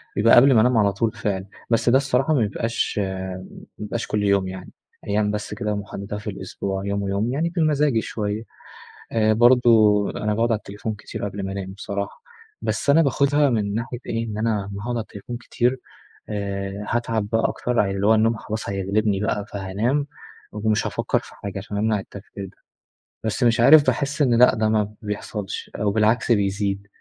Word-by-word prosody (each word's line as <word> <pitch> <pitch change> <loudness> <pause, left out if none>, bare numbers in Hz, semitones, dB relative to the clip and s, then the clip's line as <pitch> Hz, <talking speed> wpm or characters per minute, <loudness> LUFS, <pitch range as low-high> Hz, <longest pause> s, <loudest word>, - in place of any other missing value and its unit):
بيبقى 115 +3 +5
قبل 135 +3 +7
ما 110 - +6
أنام 125 +1 +3
على 100 -2 +3
طول 110 +3 0
فعلًا. 95 -3 -3 0.2
بس 115 +1 +2
ده 125 - +6
الصراحة 135 +2 +1
ما 145 - +3
بيبقاش 115 +1 -1
ما 95 -1 -4 0.3
بيبقاش 105 +2 -4
كل 105 -1 -1
يوم، 100 -2 +2
يعني 95 0 -8 0.4
أيام 105 0 +1
بس 105 0 -4
كده 105 -1 -2
محددة 100 0 -6
في 105 +1 -6
الأسبوع، 95 0 -4
يوم 100 0 -1
ويوم، 100 +4 -1
يعني 160 +5 0
بمزاجي 150 -7 +2
شوية. 105 0 -3 0.7
آآ، 110 -1 +3
برضه 115 -3 +5
أنا 105 0 -1
باقعد 115 +2 +1
على 110 - +2
التليفون 105 +1 -6
كتير 105 - -6
قبل 100 0 -5
ما 95 - -4
أنام 95 -1 -5
بصراحة، 100 0 -5 0.4
بس - - -1
أنا 150 +4 +6
باخدها 140 0 +3
من 105 -4 0
ناحية 115 +2 -3
إيه، 115 0 -2
إن 105 -1 -5
أنا 110 -2 0
أما 100 0 -7
هاقعد 120 +1 -2
على 115 - -1
التليفون 110 +3 -8
كتير، 125 +2 -1 0.5
آآ، 100 -1 -4
هاتعب 115 -3 -1
بقى 115 +1 +2
أكتر، 125 -1 -1
ع 100 - +3
اللي 100 +1 0
هو 110 - +6
النوم 115 +1 +3
خلاص 110 0 -5
هيغلبني 100 +1 0
بقى، 105 0 -1
فهانام 105 +9 -1 0.4
ومش 105 0 0
هافكر - - 0
في - - -15
حاجة، 100 -1 -6
عشان 100 +1 -6
أمنع 110 0 +1
التفكير 100 0 -9
ده. 95 - -14 0.7
بس 110 +3 -1
مش 120 -1 +3
عارف، 145 +5 +8
باحس 145 +2 0
إن 130 -4 +4
لأ، 125 - +6
ده 110 0 +1
ما 105 -1 0
بيحصلش، 105 -1 -5
أو 105 -1 0
بالعكس 110 +3 +2
بيزيد، 100 -1 0
105 Hz, 185 wpm, -23 LUFS, 100-120 Hz, 0.7 s, عارف